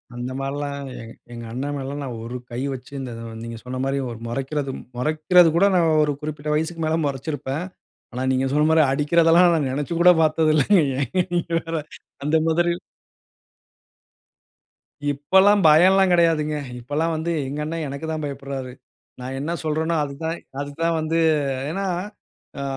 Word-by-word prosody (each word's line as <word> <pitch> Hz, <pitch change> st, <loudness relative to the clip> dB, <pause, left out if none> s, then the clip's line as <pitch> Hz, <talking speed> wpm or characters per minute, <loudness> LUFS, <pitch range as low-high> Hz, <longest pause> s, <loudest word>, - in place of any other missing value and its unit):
அந்த 125 Hz, +1 st, -4 dB
மாரில்லாம் 140 Hz, +1 st, -3 dB, 0.2 s
எங் 115 Hz, 0 st, -10 dB, 0.2 s
எங்க 120 Hz, 0 st, -7 dB
அண்ணன் 140 Hz, +5 st, -3 dB
மேல 135 Hz, -2 st, -4 dB
எல்லாம் 145 Hz, +2 st, -5 dB
நான் 120 Hz, -4 st, -5 dB
ஒரு 120 Hz, +2 st, -5 dB
கை 120 Hz, -, -4 dB
வைச்சு 130 Hz, +2 st, -10 dB, 0.5 s
நீங்க 115 Hz, 0 st, -6 dB
சொன்ன 130 Hz, +1 st, -5 dB
மாரி 135 Hz, +1 st, 0 dB, 0.3 s
மொறைக்கிறது 135 Hz, +3 st, -2 dB, 0.3 s
மொறைக்கிறது 160 Hz, +5 st, +4 dB
கூட 190 Hz, -, +5 dB
நான் 170 Hz, -2 st, +3 dB
ஒரு 145 Hz, -1 st, 0 dB
குறிப்பிட்ட 150 Hz, 0 st, -5 dB
வயசுக்கு 165 Hz, +1 st, -2 dB
மேல 160 Hz, +1 st, +1 dB
மொறச்சிருப்பேன். 140 Hz, +2 st, -3 dB, 0.5 s
ஆனா 130 Hz, +1 st, -3 dB
நீங்க 130 Hz, +1 st, +1 dB
சொன்ன 150 Hz, +1 st, +3 dB
மாரி 160 Hz, 0 st, +5 dB
அடிக்கிறதெல்லாம் 165 Hz, +4 st, +4 dB
நான் 145 Hz, -4 st, 0 dB
நெனைச்சு 145 Hz, +4 st, -3 dB
கூட 180 Hz, +1 st, +8 dB
பார்த்ததில்ல. 155 Hz, -1 st, +3 dB, 0.2 s
ஏங்க 145 Hz, +6 st, 0 dB
நீங்க 170 Hz, -1 st, -2 dB
வேற 165 Hz, 0 st, -4 dB, 0.5 s
அந்த 150 Hz, +3 st, +1 dB
மாதிரி. 170 Hz, +1 st, +1 dB, 2.3 s
இப்பல்லாம் 190 Hz, +8 st, +4 dB
பயம்லாம் 185 Hz, +4 st, +6 dB
கிடையாதுங்க. 160 Hz, -3 st, +2 dB, 0.2 s
இப்பல்லாம் 150 Hz, +7 st, -1 dB
வந்து 160 Hz, +2 st, -2 dB, 0.2 s
எங்க 145 Hz, +2 st, -5 dB
அண்ண 165 Hz, +2 st, -4 dB
எனக்கு 140 Hz, +3 st, -6 dB
தான் 155 Hz, -1 st, -3 dB
பயப்படுறாரு. 135 Hz, -2 st, -5 dB, 0.5 s
நான் 130 Hz, +1 st, -5 dB
என்ன 150 Hz, +4 st, -3 dB
சொல்றேனோ 160 Hz, +2 st, 0 dB
அது 140 Hz, -1 st, -5 dB
தான் 165 Hz, +1 st, -2 dB, 0.2 s
அது 145 Hz, 0 st, -4 dB
தான் 165 Hz, 0 st, +2 dB
வந்து 160 Hz, +1 st, -1 dB, 0.5 s
ஏன்னா 195 Hz, +4 st, -2 dB, 0.7 s
அ -, -, -3 dB
150 Hz, 150 wpm, -23 LUFS, 135-165 Hz, 2.3 s, கூட